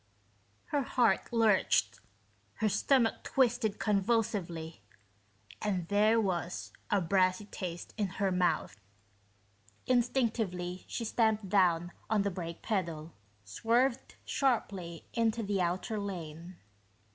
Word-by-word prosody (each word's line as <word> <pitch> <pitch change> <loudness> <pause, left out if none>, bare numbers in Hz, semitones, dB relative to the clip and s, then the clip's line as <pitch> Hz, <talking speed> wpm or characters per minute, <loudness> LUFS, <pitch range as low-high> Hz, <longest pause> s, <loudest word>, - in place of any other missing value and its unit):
Her 290 - +1
heart 240 -6 +1
lurched, 225 -4 +3 0.6
her 220 - 0
stomach 230 +3 +2
twisted 240 -5 +1
convulsively, 195 - -1 0.8
and 185 -5 -1
there 215 +3 +4
was 180 -4 -2 0.2
a 205 - +3
brassy 185 +2 +2
taste 175 -4 -6
in 210 -2 +1
her 195 -1 +1
mouth. 175 - 0 1.0
Instinctively, 225 -8 0
she 230 - -4
stamped 220 -3 +1
down 175 -3 +3 0.2
on 210 -2 +2
the 200 - 0
brake 170 -2 -6
pedal, 170 -6 -2 0.3
swerved 235 - 0
sharply 195 - -1
into 230 0 +1
the 200 -2 0
outer 185 +5 -1
lane. 175 -3 -6
200 Hz, 105 wpm, -31 LUFS, 175-225 Hz, 1.0 s, there